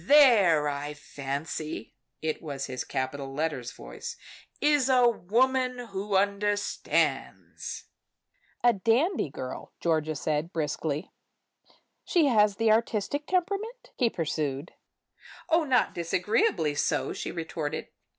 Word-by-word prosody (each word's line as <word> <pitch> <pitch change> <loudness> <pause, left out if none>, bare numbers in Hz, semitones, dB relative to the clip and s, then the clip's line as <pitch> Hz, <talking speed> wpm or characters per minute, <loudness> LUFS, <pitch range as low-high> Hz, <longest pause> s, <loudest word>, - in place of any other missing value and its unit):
There, 215 - +6
I 145 +1 -3
fancy," 145 +2 -5 0.3
it 155 -1 -1
was 140 -4 -4
his 130 -1 -4
capital 135 +1 -3
letter 155 -3 -1
voice - - -8 0.4
"is 290 -3 +3
a 250 -2 +6
woman 250 +4 +2
who 195 +1 -2
understands." 205 +1 -1 0.8
"A 240 -1 +6
dandy 230 - +2
girl," 130 -1 -7
said - - -50
Georgia, 155 -1 0
briskly. 155 0 -2 0.9
"She 340 -4 +3
has 210 -6 +4
the 225 +1 +3
artistic 230 +6 0
temperament?" 400 +7 -2
he 240 - +2
pursued. 155 -4 -2 0.8
"Oh, 330 0 +4
not 255 -3 +2
disagreeably 170 -2 +1
so," 145 - 0
she - - -4
retorted. 160 -2 -4
185 Hz, 110 wpm, -28 LUFS, 150-245 Hz, 0.9 s, There